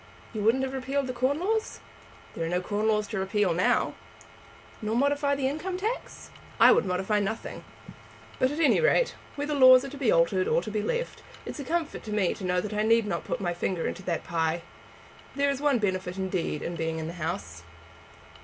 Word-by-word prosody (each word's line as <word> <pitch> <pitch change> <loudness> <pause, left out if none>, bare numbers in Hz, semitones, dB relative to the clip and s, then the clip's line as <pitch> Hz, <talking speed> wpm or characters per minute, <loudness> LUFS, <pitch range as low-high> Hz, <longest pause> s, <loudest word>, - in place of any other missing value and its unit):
"You 215 - -3
wouldn't 230 +5 +3
have 265 0 -3
repealed 270 +1 -1
the 255 - -4
corn 260 +4 +1
laws?" 435 +5 -1 0.5
"There 165 - -4
are 165 - -2
no 180 +1 +1
corn 205 +4 -1
laws 210 -1 +2
to 215 - -2
repeal 190 -1 +1
now." 180 +2 +2 0.9
"Nor 215 +1 -1
modify 285 +2 +2
the 275 -1 0
income 335 +7 -3
tax?" 440 +6 -4 0.3
"I - - +8
would - - +3
modify 190 +3 0
nothing. 205 +3 -4 0.8
But 255 - +3
at 295 +3 -4
any 325 - +4
rate, - - +3 0.2
whether 290 +1 -2
laws 255 -1 +7
are - - -5
to 285 - -9
be 265 -5 +2
altered 185 +3 +3
or - - +3
to 215 - -5
be 210 0 -1
left, 485 - -3 0.2
it - - -4
is - - -9
a - - -3
comfort 330 +3 -2
to 215 - -6
me 205 -4 +1
that 180 +2 -2
I 210 - 0
need 225 +1 +3
not 205 - -3
put - - -3
my 175 -2 -1
finger 175 0 -2
into - - -3
that 170 -3 -2
pie. 165 0 -1 0.7
There 280 0 +2
is 275 0 -4
one 290 -3 +3
benefit 185 -3 -2
indeed 185 -5 -2
in 170 - -4
being 160 -1 -2
in 160 - -4
the 165 - -5
House." 155 - -4
215 Hz, 210 wpm, -27 LUFS, 185-280 Hz, 0.9 s, I